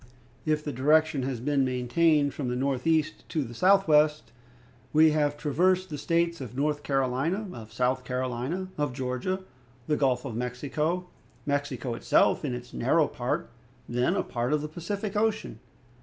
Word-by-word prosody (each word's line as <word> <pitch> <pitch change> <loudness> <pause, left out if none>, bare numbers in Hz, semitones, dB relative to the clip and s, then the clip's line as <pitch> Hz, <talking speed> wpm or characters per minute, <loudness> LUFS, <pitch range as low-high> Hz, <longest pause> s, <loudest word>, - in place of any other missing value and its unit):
If 155 -1 +1
the 150 - -3
direction 150 +2 +3
has 125 -4 -3
been 140 +2 +1
maintained 140 +4 +2
from 140 - -4
the 125 - -1
northeast 140 +4 0
to 155 - 0
the 120 -2 -8
southwest, 155 -7 +3 0.6
we 155 +1 +6
have 145 -1 +1
traversed 180 +5 +1
the 150 - -3
States 170 +1 0
of 125 -2 -7
North 145 +1 0
Carolina, 135 +10 0
of 110 -2 -10
South 125 +1 0
Carolina, 130 +8 -3
of 145 -3 0
Georgia, 130 +9 -2 0.4
the 150 - +1
Gulf 130 -2 +1
of 120 -5 -5
Mexico, 145 +8 -2 0.4
Mexico, 140 -4 -2
itself, 115 - +2
in 130 -5 -2
its 125 0 -9
narrow 60 - +2
part, - - -3 0.4
then 125 +1 +1
a - - +1
part 120 +3 -2
of 150 -1 +1
the - - -3
Pacific 195 +6 -4
Ocean. 215 - 0
145 Hz, 155 wpm, -28 LUFS, 125-160 Hz, 0.6 s, we